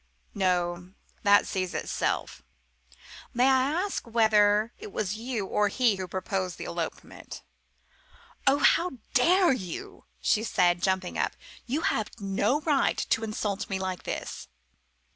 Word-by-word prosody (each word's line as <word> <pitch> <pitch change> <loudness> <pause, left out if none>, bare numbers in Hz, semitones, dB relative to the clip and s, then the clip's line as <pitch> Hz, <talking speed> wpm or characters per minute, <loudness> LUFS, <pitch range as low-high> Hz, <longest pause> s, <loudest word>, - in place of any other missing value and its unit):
"No 180 -2 -1 0.3
that 205 0 +5
sees 185 -2 -3
itself! - - -2 0.9
May 245 - +3
I 265 0 +4 0.2
ask 390 -10 -4
whether 215 -1 +3
it 425 -1 -9
was 205 - -2
you 230 -2 -3
or 210 +2 +1
he 225 -1 +2
who 185 -1 -4
proposed 185 0 -3
this - - -6
elopement?" - - -6 1.0
"Oh, 275 +1 +6
how 345 +3 +3 0.2
dare 345 +7 +5
you!" 185 -9 -7
she 215 - +2
said, 175 -5 +2
jumping 190 -1 0
up; - - 0 0.3
"you 280 +6 -1
have 280 - 0
no 205 +8 0
right 295 -3 +2
to 225 - +2
insult 210 -2 -3
me 195 - -1
like 185 -2 -3
this." - - -5
210 Hz, 135 wpm, -27 LUFS, 190-255 Hz, 1.0 s, Oh